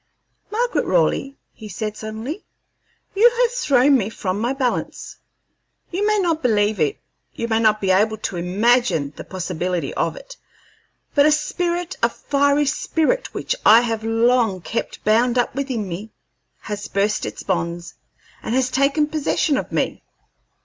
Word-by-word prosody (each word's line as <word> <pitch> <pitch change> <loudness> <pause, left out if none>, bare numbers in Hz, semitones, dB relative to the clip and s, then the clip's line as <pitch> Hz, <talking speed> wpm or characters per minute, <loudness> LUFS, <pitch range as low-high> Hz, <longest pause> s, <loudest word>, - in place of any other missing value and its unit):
"Margaret 475 +3 0
Raleigh," 275 - +1 0.2
he 215 -2 -11
said, 210 +3 -4
suddenly, 220 - -6 0.7
"you 435 +5 +6
have 475 - +2
thrown 285 - +3
me 205 -1 -2
from 200 -3 -3
my 240 +3 0
balance. 265 -3 -3 0.7
You 395 +4 0
may 425 0 +3
not 335 -5 0
believe 210 -4 +1
it, 150 -3 +1 0.4
you 230 - -3
may 225 -1 +1
not 215 -1 +3
be 195 -2 +1
able 215 +3 +2
to 195 -3 -4
imagine 180 - +1
the - - -8
possibility 180 -1 -3
of - - -1
it, - - -12 0.8
but 285 0 +5
a - - +4
spirit, 345 +3 -1
a - - +4
fiery 285 +1 +1
spirit 325 - 0
which - - -1
I 225 +2 +8
have 225 -2 -2
long 225 -3 +2
kept 230 - -4
bound 235 +3 +3
up 245 - +1
within 255 -6 -3
me, 190 +5 -6 0.5
has 210 -1 -5
burst 205 +2 0
its - - -6
bonds 170 -2 -3 0.5
and 230 - -2
has 255 -1 +1
taken 275 +3 +2
possession 300 -1 0
of - - -3
me. - - -1
235 Hz, 155 wpm, -21 LUFS, 205-295 Hz, 0.8 s, I